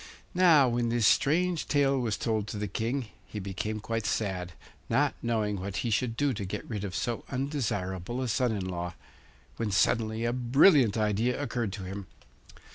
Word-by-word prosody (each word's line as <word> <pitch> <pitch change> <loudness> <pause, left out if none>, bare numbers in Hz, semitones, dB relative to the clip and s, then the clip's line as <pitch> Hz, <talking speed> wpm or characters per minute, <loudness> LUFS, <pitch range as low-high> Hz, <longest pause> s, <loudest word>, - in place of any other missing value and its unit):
Now 170 -7 +6
when 120 -1 0
this 115 -1 +1
strange 170 +7 +3
tale 140 -2 +2
was 115 -4 -1
told 110 -3 -1
to 105 - -5
the 105 0 -2
King 115 +5 -2 0.2
he - - -8
became 100 +2 -3
quite 115 0 -3
sad, 95 -5 -2 0.4
not - - +2
knowing 110 -4 0
what 100 +2 -4
he 115 - 0
should 115 +1 0
do 145 -1 +2
to 105 - -4
get 100 +2 -5
rid 105 -4 -4
of 95 -2 -4
so 120 -2 -2
undesirable 120 - -2
a - - -2
son 125 +1 +1
in 100 -4 -2
law, 90 -1 -4 0.6
when 115 -2 -1
suddenly 110 +3 +1
a 120 - +1
brilliant 125 - +5
idea 110 +4 +1
occurred 120 -7 -2
to 95 - -6
him. 95 +1 -6
115 Hz, 180 wpm, -29 LUFS, 100-125 Hz, 0.6 s, Now